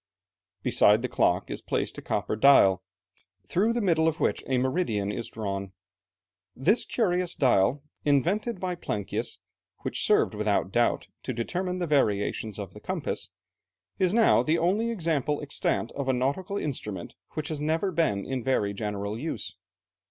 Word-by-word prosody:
Beside 105 +3 +4
the - - +1
clock 95 -6 +1
is - - -4
placed - - -2
a - - -7
copper - - -1
dial, 105 -6 +6 0.7
through 205 +6 +2
the 235 0 0
middle 165 -5 +3
of 160 - 0
which - - 0
a 130 - +1
meridian 125 - 0
is 115 +2 -4
drawn. 100 -3 -4 0.8
This 190 - +2
curious 180 -6 0
dial, 130 +1 +3 0.2
invented 180 - +1
by 185 -1 -2
Plancius, 105 - -3 0.4
which - - -2
served - - +3
without 105 -3 0
doubt 120 +3 +2 0.2
to 130 - -4
determine 180 +10 -2
the 180 - -1
variations 110 - 0
of 100 -3 -6
the - - -11
compass, - - -3 0.7
is 185 -2 +3
now 225 +1 +5
the 160 +2 +1
only 200 +8 +1
example 160 - 0
extant 145 -5 0
of 140 -2 -3
a - - +4
nautical 140 +11 -1
instrument 105 - -4 0.2
which 155 -1 -4
has 155 -2 -4
never 160 +6 0
been 155 - 0
in 130 -2 -3
very 110 -6 +1
general 105 +1 -3
use. 160 +5 -4
140 Hz, 155 wpm, -27 LUFS, 105-175 Hz, 0.8 s, dial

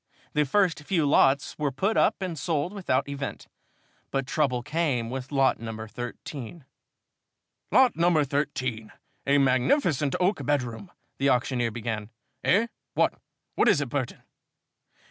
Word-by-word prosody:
The 150 0 +2
first 180 +4 +2
few 160 +1 0
lots 140 0 +3
were 145 -2 0
put 195 +12 0
up - - +2
and 180 -3 -3
sold 160 +3 -1
without 160 -10 0
event, 140 -1 -5 0.6
but 135 -1 -1
trouble 130 -4 0
came 145 -6 -1
with 130 +1 -5
lot 135 -2 +3
number 110 -1 -6
13. 125 +4 -7 1.1
"Lot 260 -2 +5
number 170 -2 +3
13 130 -6 -2 0.4
a 140 +1 +5
magnificent 135 - +2
oak 185 +3 +1
bedroom 140 - -2 0.2
" - - -48
the 140 +1 +3
auctioneer 125 -1 +1
began. 110 -2 -4 0.3
"Eh? 205 +6 +4 0.3
What? - - +3 0.4
What - - +2
is - - +4
it, - - -2
Burton?" - - -3
140 Hz, 140 wpm, -27 LUFS, 125-165 Hz, 1.1 s, Lot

